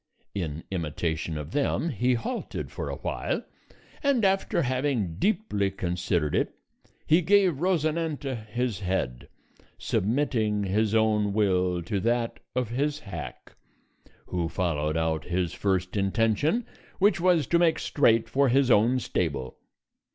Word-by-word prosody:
In 80 -5 -4
imitation 80 -2 -2
of 75 +1 -6
them 145 +3 0
he 125 -3 +1
halted 230 - -4
for - - -4
a - - -3
while, - - -3 0.6
and 275 -7 +2
after 190 -3 +2
having 125 - -1
deeply 180 - +1
considered 90 -4 -1
it, - - 0 0.5
he 160 +3 +4
gave 185 -4 +3
Rosinante 155 -8 -1
his 120 -2 -2
head, 90 -11 -2 0.5
submitting 110 -2 0
his 105 +3 +1
own 105 -2 +2
will 90 -4 +1
to 100 +4 -2
that 115 +2 0 0.2
of 125 -3 0
his 145 +5 -1
hack, 100 - -8 0.7
who 85 -2 -2
followed 80 -3 -1
out 80 -1 0
his 90 -1 -1
first 95 -2 -1
intention, 115 - +1 0.3
which 200 -2 +3
was 175 -5 +4
to 170 - +2
make 170 -2 +3
straight 115 -5 +2
for 135 +3 +2
his 135 0 +3
own 115 +5 +4
stable. 70 - -2
110 Hz, 130 wpm, -27 LUFS, 90-145 Hz, 0.7 s, he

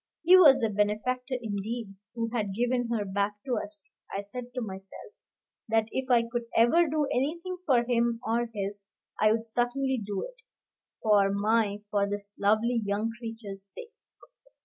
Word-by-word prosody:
He 355 +3 +8
was 280 -9 +7
a 225 - +3
benefactor, 215 +6 -1
indeed, 220 0 -4 0.2
who 230 -1 -2
had 205 -5 -1
given 245 +1 0
her 225 -3 -1
back 200 +1 0
to 255 -3 0
us. 205 -1 -9 0.2
I 195 - -2
said 245 +4 -8
to 250 - -2
myself, 195 - -8 0.6
that 225 0 +3
if 265 0 -3
I 240 -2 +5
could 235 0 -4
ever 320 +10 +5
do 300 0 +1
anything 340 +8 -1
for 245 -4 +4
him 235 -1 +1
or 235 +1 0
his, 200 -1 -4 0.4
I 215 0 +5
would 225 +1 -1
certainly 245 +2 0
do 200 -1 -3
it, - - -9 0.7
for 205 -3 +4
my 205 0 +1
for 200 -1 +1
this 205 0 -3
lovely 220 +4 +2
young 205 +3 -1
creature's 225 -4 -7
sake. 450 - -10
230 Hz, 165 wpm, -28 LUFS, 205-245 Hz, 0.7 s, He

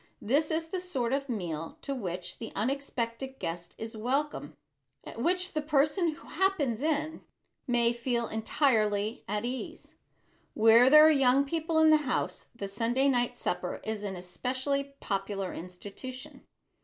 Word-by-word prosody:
This 285 +8 +1
is 325 0 -1
the 370 - -2
sort 270 -10 -2
of 275 0 -1
meal 165 -8 -4
to 275 - -2
which 180 -7 -5
the 225 - -6
unexpected 260 +1 -2
guest 170 -3 -5
is 225 0 -6
welcome, 245 - -2 0.5
at 230 - -8
which 365 +5 +1
the 305 - 0
person 305 +3 +2
who - - -16
"happens 300 - 0
in" 310 +1 -1 0.5
may 240 -1 +3
feel 235 -1 -1
entirely 220 -2 +1
at 210 +2 -2
ease. 250 +1 -6 0.6
Where 225 +3 +7
there 305 +2 +9
are 315 - +7
young 275 -1 +4
people 325 +2 -1
in 315 0 +6
the 310 - +7
house, 280 -5 -2
the 200 -4 -4
Sunday 235 +7 +1
night 245 -1 +1
supper 180 0 -2
is 220 -1 -4
an 195 -2 -3
especially 260 +10 -2
popular 195 -1 -2
institution. 200 +9 -8
250 Hz, 150 wpm, -29 LUFS, 215-290 Hz, 0.6 s, there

